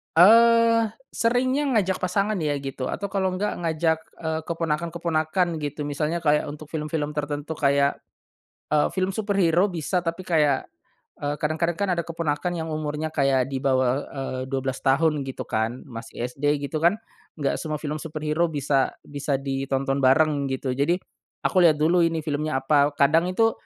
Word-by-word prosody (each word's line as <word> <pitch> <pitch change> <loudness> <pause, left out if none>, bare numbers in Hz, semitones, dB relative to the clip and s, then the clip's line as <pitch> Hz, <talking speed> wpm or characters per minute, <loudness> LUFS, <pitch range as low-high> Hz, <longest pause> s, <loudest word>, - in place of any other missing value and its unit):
Eee, 230 +4 +6 0.2
seringnya 255 +5 +1
ngajak 190 -3 +1
pasangan 200 +2 0
ya 150 -3 0
gitu 135 -2 -4
atau 200 - -3
kalau 190 -2 0
enggak 200 +3 -2
ngajak, 160 -1 +1 0.2
eee, 160 -1 -2
keponakan-keponakan 165 +1 -1
gitu. 150 0 -4
Misalnya 150 +4 -2
kayak 150 -1 +2
untuk 150 0 -8
film-film 150 -1 -2
tertentu 150 0 -4
kayak, 140 0 +2 0.7
eee, 150 -1 +3
film 185 0 0
superhero 195 -3 +2
bisa, 175 +1 -1
tapi 170 +2 -4
kayak 150 -6 +2 0.6
eee, 145 0 -2
kadang-kadang 160 +3 -1
kan 200 +1 -1
ada 175 - 0
keponakan 165 0 -2
yang 165 -1 -4
umurnya 155 0 -3
kayak 135 -4 +2
di 135 - -2
bawah, 130 0 +1
eee, 135 -2 -5
12 135 -1 -2
tahun 150 +3 +2
gitu 130 - -5
kan 110 +3 -2
masih 120 -1 -7
SD 145 +3 0
gitu 150 +3 -3
kan, 170 +5 +4 0.4
nggak 145 -3 -1
semua 155 -2 -3
film 150 0 -4
superhero 155 +2 -1
bisa 140 -3 0
bisa 145 -1 -2
ditonton 135 0 -1
bareng 140 +1 +3
gitu. 130 0 -2
Jadi 145 +7 +2 0.5
aku 185 - +2
lihat 160 -3 +6
dulu 165 +4 +3
ini 165 -2 0
filmnya 150 -1 -1
apa, 145 +1 +3
kadang 160 +5 +3
itu 225 +5 +2
155 Hz, 155 wpm, -24 LUFS, 140-170 Hz, 0.7 s, Eee